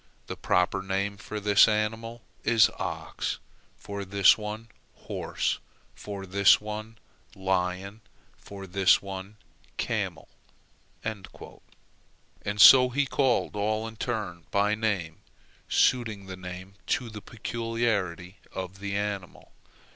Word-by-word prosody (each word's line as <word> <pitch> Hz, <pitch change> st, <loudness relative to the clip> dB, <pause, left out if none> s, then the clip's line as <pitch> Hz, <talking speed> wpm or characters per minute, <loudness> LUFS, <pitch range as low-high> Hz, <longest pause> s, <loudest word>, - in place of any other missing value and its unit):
The -, -, -6 dB
proper 90 Hz, +2 st, +1 dB
name 100 Hz, +1 st, -2 dB
for 105 Hz, +2 st, -6 dB
this 105 Hz, 0 st, +6 dB
animal 110 Hz, +2 st, -2 dB, 0.2 s
is 115 Hz, -2 st, +5 dB
ox, -, -, -3 dB, 0.4 s
for 100 Hz, -1 st, -6 dB
this 100 Hz, 0 st, +5 dB
one 110 Hz, +1 st, -6 dB, 0.3 s
horse, -, -, -2 dB, 0.3 s
for 100 Hz, -2 st, -7 dB
this 100 Hz, +1 st, +5 dB
one 105 Hz, +1 st, -7 dB, 0.4 s
lion, 95 Hz, +2 st, -1 dB, 0.3 s
for 100 Hz, -1 st, -10 dB
this 95 Hz, +1 st, +4 dB
one 95 Hz, +1 st, -8 dB, 0.4 s
camel." -, -, -2 dB, 0.8 s
And 105 Hz, -4 st, -4 dB, 1.3 s
so 125 Hz, +4 st, +9 dB
he 140 Hz, +3 st, +1 dB
called 130 Hz, -5 st, +1 dB
all 110 Hz, +2 st, 0 dB
in 115 Hz, -, -9 dB
turn 105 Hz, -8 st, -4 dB
by 100 Hz, +1 st, +2 dB
name, 100 Hz, -7 st, -1 dB, 0.5 s
suiting 110 Hz, -6 st, +2 dB
the 95 Hz, -1 st, -7 dB
name 90 Hz, +1 st, -8 dB, 0.2 s
to 125 Hz, -, -8 dB
the 105 Hz, -1 st, -8 dB
peculiarity 110 Hz, -6 st, -2 dB, 0.2 s
of 95 Hz, 0 st, -6 dB
the 100 Hz, 0 st, -3 dB
animal. 100 Hz, -3 st, -4 dB
100 Hz, 115 wpm, -27 LUFS, 95-110 Hz, 1.3 s, so